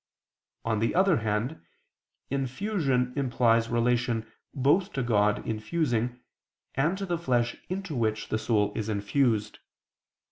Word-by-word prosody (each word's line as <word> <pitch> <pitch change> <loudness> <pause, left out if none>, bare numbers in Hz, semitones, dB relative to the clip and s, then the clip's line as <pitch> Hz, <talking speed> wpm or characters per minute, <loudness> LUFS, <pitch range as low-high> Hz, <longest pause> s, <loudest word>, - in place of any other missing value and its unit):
On 110 -2 +1
the 115 - 0
other 190 -3 +4
hand, 110 +7 -2 0.7
infusion 135 - 0
implies 120 -4 +2
relation 120 -1 +1 0.3
both 145 +8 +2
to 135 - -1
God 105 -3 +2
infusing 120 +1 -1 0.5
and 155 +8 +1
to 195 - -3
the 175 -3 -1
flesh 120 -7 +1
into 185 -4 -4
which 110 -2 -1
the 110 - 0
soul 105 -3 +1
is 110 -1 -2
infused. 110 +1 0
120 Hz, 120 wpm, -28 LUFS, 110-145 Hz, 0.7 s, other